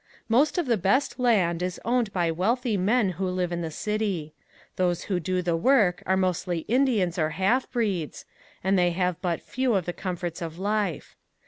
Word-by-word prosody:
Most 275 +9 +3
of 350 - +1
the 235 -4 +2
best 205 +10 +1
land 190 -9 +2
is 180 -1 -3
owned 240 -2 +1
by 175 -3 0
wealthy 225 +7 0
men 205 +3 +2
who 190 - +1
live 180 -1 -1
in 175 0 -2
the 165 - -3
city. 195 -4 -2 0.4
Those 175 -2 0
who 185 -3 -1
do 180 +2 -1
the 170 -1 +1
work 195 -2 +3
are 190 0 +3
mostly 180 -2 0
Indians 225 -8 +2
or 155 -1 +2
half 235 +8 +2
breeds, 200 - -2 0.4
and 190 +1 +2
they 175 0 +4
have 180 -1 -1
but 175 -3 -2
few 255 -3 0
of 185 -4 0
the 175 - -3
comforts 180 -2 -4
of 165 -1 -5
life. 205 -3 -2
185 Hz, 190 wpm, -26 LUFS, 175-220 Hz, 0.4 s, they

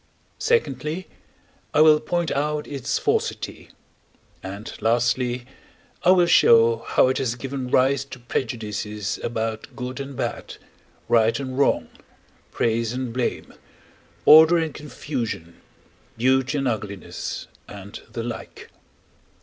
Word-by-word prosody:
secondly, 185 - 0 0.7
I 150 - +6
will 155 -1 +7
point 175 0 -1
out 150 +1 -1
its 140 -4 -2
falsity; - - -2 0.7
and, 100 +3 -7
lastly, 120 +2 +1 0.6
I - - +3
will 180 -1 +6
show 115 -7 +6
how 115 - +2
it 130 - 0
has 125 -3 -1
given 130 0 -5
rise 130 +2 +3
to 135 - -10
prejudices 105 -4 -3
about 115 +1 -4
good 125 +1 -5
and 140 0 -6
bad, - - -4 0.5
right 115 +1 +3
and 130 -2 -5
wrong, 140 +1 +2 0.6
praise 115 0 0
and 125 -2 -4
blame, 125 -1 -2 0.7
order 160 +3 +8
and 160 -3 -1
confusion, 120 - -5 0.6
beauty 130 +4 +2
and 135 -1 0
ugliness, 105 -5 -4 0.2
and 100 0 -10
the 115 0 -4
like. 120 -1 -8
125 Hz, 115 wpm, -23 LUFS, 115-140 Hz, 0.7 s, order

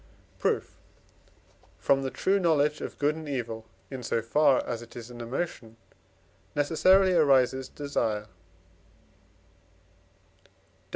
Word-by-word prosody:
Proof. - - -1 1.0
From 135 0 +2
the 135 - -2
true 195 +8 +1
knowledge 150 -4 +2
of - - -6
good 150 +1 +1
and 160 -2 -7
evil, 115 -4 -4 0.2
in 130 -2 -5
so 115 - -1
far 135 +3 +3
as 120 -1 -4
it 120 - -13
is 120 0 -8
an 120 -1 -9
emotion, 115 -2 -5 0.8
necessarily 185 +6 +4
arises 130 -5 +3
desire 115 -7 -2 2.2
(Def. - - -28
135 Hz, 115 wpm, -28 LUFS, 120-150 Hz, 2.2 s, necessarily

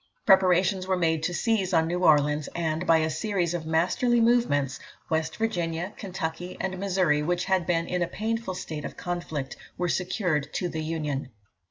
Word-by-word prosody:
Preparations 185 0 +4
were 190 -1 +1
made 160 -2 +1
to 170 - -1
seize 195 -1 0
on 160 0 +4
New 175 +2 -2
Orleans; 150 -2 +3
and, 160 0 -1
by 165 - +6
a 160 0 +1
series 175 +1 -1
of 165 -2 -4
masterly 180 +10 +2
movements, 225 - +2 0.3
West 160 0 -1
Virginia, 175 -4 -2
Kentucky, 180 -2 -5
and 190 -1 -3
Missouri, 185 -6 +2
which 175 +3 0
had 190 -3 +1
been 165 -1 +1
in 180 +1 -2
a 175 - +1
painful 220 -1 -3
state 155 -4 -5
of - - -7
conflict, 170 -6 -4 0.2
were 180 -1 -1
secured 175 -6 -1
to 180 - 0
the 160 - -4
Union. 150 -4 -3
175 Hz, 175 wpm, -27 LUFS, 160-190 Hz, 0.3 s, by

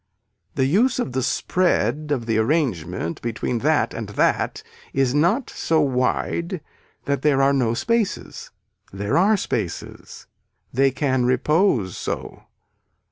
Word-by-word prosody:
The 130 - +2
use 220 - +2
of 245 - -2
the 130 +1 -1
spread 155 -1 0
of 125 -5 -1
the 110 -1 +1
arrangement 110 - -1
between 120 +1 -2
that 145 -3 +1
and 110 -3 -5
that 100 - 0 0.3
is 135 -2 +1
not 175 - +2
so 160 -1 0
wide 150 +6 0 0.5
that 140 -1 -1
there 145 -2 +3
are 135 +1 +4
no 120 -4 +1
spaces. 230 - -2 0.4
There 100 +2 -2
are 205 +4 +4
spaces. - - -5 0.5
They 135 +2 +4
can 130 -2 0
repose 130 - +2
so. - - -5
135 Hz, 130 wpm, -22 LUFS, 120-165 Hz, 0.5 s, are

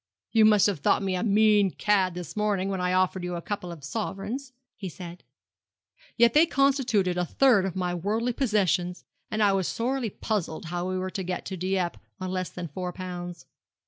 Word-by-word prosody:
'You 220 -2 +5
must 210 -2 +6
have 200 -7 +1
thought 170 - +2
me 190 -1 0
a 180 - -1
mean 210 -2 +4
cad 190 -2 +1
this 175 -2 -7
morning, 205 -3 0
when 190 -2 -2
I 180 0 +1
offered 185 0 +1
you 180 0 -3
a 170 - -4
couple 200 -4 -4
of 160 -4 -10
sovereigns,' 220 - -4 0.2
he 190 - -6
said; 175 0 -10 0.9
'yet 235 -1 +5
they 315 +3 +6
constituted 255 - +2
a - - +2
third 230 -1 +4
of 190 - -3
my 180 -1 -1
worldly 215 +7 -1
possessions, 185 - 0 0.2
and 215 0 +1
I 205 - +5
was 190 -2 0
sorely 245 0 -1
puzzled 185 -6 -3
how 175 +2 -3
we 185 - -1
were 185 0 -3
to 195 - -3
get 180 -1 -4
to 190 - -4
Dieppe 185 -1 -1 0.2
on 185 0 -4
less 185 -1 -2
than 180 -1 -6
four 180 +4 -4
pounds. 175 -1 -7
190 Hz, 200 wpm, -27 LUFS, 180-215 Hz, 0.9 s, must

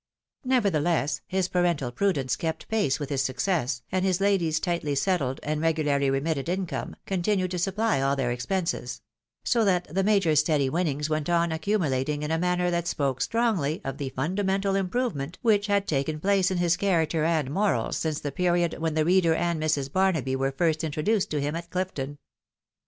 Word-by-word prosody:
Nevertheless, 175 - +1
his 190 -1 0
parental 175 -9 0
prudence 135 - 0
kept 160 +2 -4
pace 210 -13 +1
with 145 -1 -5
his 135 -2 +1
success, 130 -1 -1
and 185 0 0
his 185 -1 +1
lady's 185 -6 +2
tightly 170 -5 -1
settled, 140 -5 0
and 150 +1 -2
regularly 150 -4 +1
remitted 140 +2 -1
income, 185 -1 -3
continued 185 0 0
to 180 - -2
supply 195 -2 +1
all 135 +1 +2
their 130 -3 -1
ex 120 0 -4
penses; 170 -10 -2 0.4
so 235 -2 +2
that 180 -4 +2
the 195 +1 +1
Major's 190 -7 +3
steady 150 -3 +1
winnings 150 -3 -1
went 155 0 -2
on 170 -1 +2
accumu 170 +3 0
lating 145 +3 -1
in 150 - -2
a 160 - +1
manner 180 0 +1
that 170 0 -1
spoke 135 -6 -1
strongly 215 -11 0
of 135 +2 -4
the 140 -2 -3
fundamental 190 +8 -1
improvement 185 - -2
which 210 -3 +3
had 200 -1 +2
taken 150 +1 -1
place 195 +1 +2
in 185 - -1
his 175 0 +2
character 165 -5 +1
and 155 -4 +1
morals 200 +5 0
since 155 -2 -1
the 145 - -3
period 175 -1 +1
when 160 -1 -1
the 155 -1 +2
reader 175 -2 +4
and 170 -2 -1
Mrs. 145 -3 -1
Barnaby 165 -9 +1
were 135 +1 0
first 160 +3 0
introduced 160 +7 0
to 150 - -1
him 145 +2 -2
at 170 0 -6
Clifton. 145 -7 -3
165 Hz, 185 wpm, -26 LUFS, 145-190 Hz, 0.4 s, reader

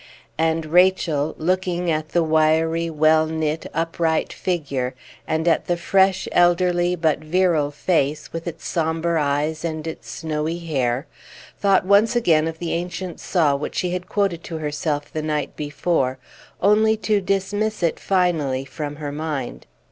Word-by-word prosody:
And 160 0 +1
Rachel, 160 -3 +2
looking 180 0 0
at 155 0 -2
the 170 - +2
wiry, 160 +1 +2
well 155 0 +3
knit, 160 0 -2
upright 165 0 -1
figure, 140 -8 -2 0.3
and 160 +1 -1
at 165 - +2
the 175 - +1
fresh, 190 +1 +2
elderly, 175 0 +3
but 160 -3 +1
virile 160 -2 +1
face, 150 -1 -1
with 165 +1 -5
its 170 -1 -6
sombre 165 0 0
eyes 150 +3 -1
and 160 -2 -3
its 160 - -7
snowy 160 +1 -3
hair, 135 -5 -1 0.5
thought 195 -2 +3
once 205 +4 +4
again 165 -9 +3
of 165 0 -5
the 170 0 -3
ancient 175 +1 -4
saw 155 -6 +2
which 140 - -5
she 180 -1 -1
had 180 0 -4
quoted 195 -5 0
to 165 - -5
herself 150 -1 -3
the 155 - -2
night 150 -1 -2
before, 145 -3 -1 0.5
only 220 +2 +4
to 210 -1 +1
dismiss 200 +2 -1
it 165 - +1
finally 160 -9 0
from 145 0 -6
her 145 -1 -5
mind. 145 -4 -4
165 Hz, 150 wpm, -22 LUFS, 155-180 Hz, 0.5 s, once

